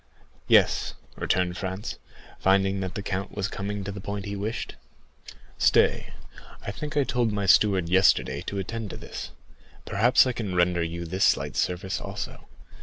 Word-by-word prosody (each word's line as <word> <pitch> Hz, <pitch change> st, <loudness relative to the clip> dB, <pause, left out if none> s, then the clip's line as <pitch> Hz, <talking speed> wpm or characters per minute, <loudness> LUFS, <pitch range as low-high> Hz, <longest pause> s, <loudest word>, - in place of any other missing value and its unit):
"Yes," -, -, +4 dB, 0.2 s
returned 90 Hz, -1 st, 0 dB
Franz, 95 Hz, +3 st, -4 dB, 0.4 s
finding 95 Hz, 0 st, +3 dB
that 95 Hz, -1 st, -4 dB
the 100 Hz, -, -4 dB
count 95 Hz, 0 st, -4 dB
was 100 Hz, -2 st, -1 dB
coming 100 Hz, +1 st, -4 dB
to 100 Hz, -, -4 dB
the 100 Hz, -1 st, -7 dB
point 100 Hz, 0 st, -4 dB
he 100 Hz, 0 st, -4 dB
wished. 105 Hz, +3 st, -4 dB, 0.9 s
"Stay, -, -, +3 dB, 0.5 s
I -, -, -2 dB
think 150 Hz, +7 st, -5 dB
I 145 Hz, -, +5 dB
told 120 Hz, -4 st, 0 dB
my 100 Hz, -1 st, -1 dB
steward 95 Hz, -2 st, +4 dB
yesterday 95 Hz, +2 st, +3 dB
to 100 Hz, -, -3 dB
attend 110 Hz, +2 st, -4 dB
to -, -, -7 dB
this; -, -, -7 dB, 0.6 s
perhaps 120 Hz, +7 st, +4 dB
I 130 Hz, -, +1 dB
can 105 Hz, -6 st, -4 dB
render 90 Hz, 0 st, +2 dB
you 85 Hz, +1 st, -3 dB
this 95 Hz, +4 st, +1 dB
slight -, -, +1 dB
service 90 Hz, +2 st, -1 dB
also." -, -, -6 dB
100 Hz, 165 wpm, -26 LUFS, 95-105 Hz, 0.9 s, I